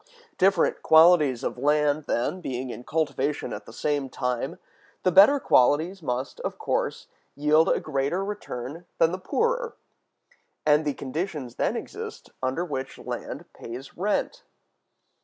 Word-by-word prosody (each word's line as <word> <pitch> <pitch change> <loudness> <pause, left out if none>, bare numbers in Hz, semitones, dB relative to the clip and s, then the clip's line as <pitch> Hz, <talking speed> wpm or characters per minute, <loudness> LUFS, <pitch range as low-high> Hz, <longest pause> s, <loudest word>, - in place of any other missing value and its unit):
Different 190 -2 +3
qualities 160 -6 +5
of - - -3
land, 150 +1 +2
then, 155 +10 -1
being 130 -4 -4
in 120 - -8
cultivation 145 -1 -1
at 105 0 -8
the - - -10
same 145 +2 -1
time, 125 -2 -2 0.5
the 185 - +3
better 205 +11 +7
qualities 160 - +3
must, 130 -2 -3
of - - -4
course, - - -2 0.3
yield 150 +2 +4
a - - +2
greater 155 +6 -1
return 165 -5 -6
than 165 0 +4
the 185 - -4
poorer, 475 - -1 0.9
and 150 +1 +4
the 145 - -1
conditions 145 -3 -4
then - - 0
exist - - -7
under 130 +7 -1
which 135 -5 -5
land - - -6
pays 125 +4 -9
rent. 210 - -1
150 Hz, 140 wpm, -26 LUFS, 130-180 Hz, 0.9 s, better